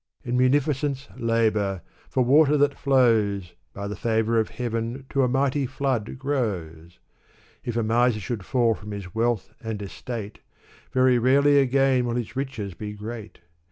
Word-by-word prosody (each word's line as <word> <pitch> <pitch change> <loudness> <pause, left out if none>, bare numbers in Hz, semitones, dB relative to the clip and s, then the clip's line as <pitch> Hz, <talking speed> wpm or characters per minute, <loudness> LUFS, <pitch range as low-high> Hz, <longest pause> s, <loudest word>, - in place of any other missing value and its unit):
In 120 0 -2
munificence 140 +1 +1
labor! 110 -5 0 0.3
for 130 - +2
water 150 +3 +5
that 145 0 +3
flows. 110 -10 +2 0.2
By 100 0 -6
the 105 - -4
favor 110 +2 +1
of 110 - 0
Heaven 120 +2 -4
to 140 - +2
a 130 - +3
mighty 135 +2 +1
flood 130 -4 -2
grows! 90 - -3 0.7
If 120 -1 -3
a 115 - +1
miser 115 +1 +2
should 105 0 -4
fall 120 +1 +2
from 105 0 -8
his 100 -3 -7
wealth 115 -1 -1
and 110 -2 -4
estate, 105 +1 -6 0.5
Very 130 -1 +4
rarely 140 +4 +4
again 135 -1 +3
will 120 - -1
his 120 0 -4
riches 130 -8 -4
be 105 +4 -6
great. 110 -1 -8
120 Hz, 155 wpm, -25 LUFS, 105-135 Hz, 0.7 s, water